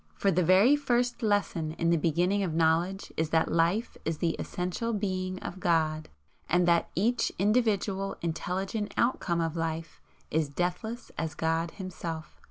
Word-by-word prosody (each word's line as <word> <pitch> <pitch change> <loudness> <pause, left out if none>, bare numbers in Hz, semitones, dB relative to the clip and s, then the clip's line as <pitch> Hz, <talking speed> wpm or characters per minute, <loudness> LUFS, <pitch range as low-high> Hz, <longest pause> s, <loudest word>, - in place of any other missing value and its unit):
For 200 - +2
the 180 +1 +2
very 195 - +6
first 245 -4 0
lesson 205 -7 0
in 170 +1 +1
the - - +5
beginning 175 +5 +1
of 175 -5 -1
knowledge 165 +4 +1
is 160 -1 0
that 160 0 +2
Life 170 +8 +1
is 160 -1 -2
the 165 0 0
essential 185 +6 -2
Being 185 -3 -2
of 180 - -6
God, 155 -3 +1 0.4
and 175 +1 +3
that 170 -1 +3
each 230 +6 +1
individual 200 -2 +1
intelligent 190 +5 -2
outcome 180 -8 +1
of 165 0 -1
Life 165 -1 -4 0.3
is 155 -2 +1
deathless 180 +10 -3
as 160 - -3
God 165 +1 0
Himself. 170 -4 -7
180 Hz, 155 wpm, -29 LUFS, 165-200 Hz, 0.4 s, very